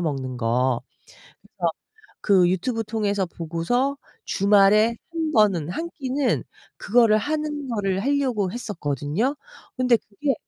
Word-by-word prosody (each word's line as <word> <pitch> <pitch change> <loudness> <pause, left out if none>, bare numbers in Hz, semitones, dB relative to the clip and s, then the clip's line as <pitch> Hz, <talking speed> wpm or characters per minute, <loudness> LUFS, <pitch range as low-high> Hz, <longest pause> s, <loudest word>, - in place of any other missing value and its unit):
먹는 135 -6 -3
거. 120 +1 +1 0.6
그래서 - - -3 0.5
그 185 -4 +4
유튜브 225 +5 -1
통해서 205 -2 -1
보고서 170 - -1 0.3
주말에 205 +3 +4 0.2
1 320 -2 -2
번은 195 - +3
1 330 - -3
끼는 270 -1 0 0.4
그거를 225 -1 +4
하는 295 +1 -3
거를 195 -4 -1
하려고 255 -8 0
했었거든요. 190 - -2 0.4
근데 250 -2 +4
그게 270 +7 -2
210 Hz, 240 characters per minute, -23 LUFS, 175-255 Hz, 0.6 s, 그